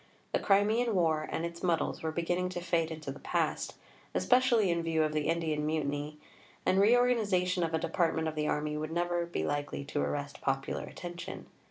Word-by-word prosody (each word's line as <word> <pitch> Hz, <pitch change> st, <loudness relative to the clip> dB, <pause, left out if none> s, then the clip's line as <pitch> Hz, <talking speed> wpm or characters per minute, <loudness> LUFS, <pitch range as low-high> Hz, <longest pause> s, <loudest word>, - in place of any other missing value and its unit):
The -, -, +2 dB
Crimean 215 Hz, +3 st, +3 dB
War 160 Hz, -3 st, +2 dB
and 165 Hz, -, -1 dB
its 170 Hz, 0 st, -6 dB
muddles 175 Hz, -3 st, 0 dB
were 160 Hz, -, -1 dB
beginning 175 Hz, +2 st, 0 dB
to 180 Hz, -, -4 dB
fade 170 Hz, -2 st, 0 dB
into 155 Hz, -3 st, -5 dB
the 140 Hz, -, -9 dB
past, -, -, -1 dB, 0.4 s
especially 245 Hz, -6 st, +4 dB
in 170 Hz, 0 st, +1 dB
view 165 Hz, -1 st, +1 dB
of 155 Hz, 0 st, 0 dB
the 150 Hz, -1 st, 0 dB
Indian 160 Hz, -2 st, 0 dB
Mutiny; 150 Hz, -1 st, -2 dB, 0.5 s
and 185 Hz, +1 st, +3 dB
reorganization 205 Hz, -6 st, +3 dB
of 165 Hz, -1 st, 0 dB
a -, -, +3 dB
department 160 Hz, 0 st, 0 dB
of 160 Hz, -, -2 dB
the 150 Hz, -1 st, -1 dB
Army 150 Hz, 0 st, -1 dB
would 155 Hz, +1 st, -3 dB
never 175 Hz, 0 st, 0 dB
be 170 Hz, -, -2 dB
likely 145 Hz, -1 st, -2 dB
to 145 Hz, 0 st, -2 dB
arrest 145 Hz, 0 st, -3 dB
popular 135 Hz, 0 st, -1 dB
attention. 175 Hz, -1 st, -7 dB
165 Hz, 185 wpm, -31 LUFS, 155-180 Hz, 0.5 s, especially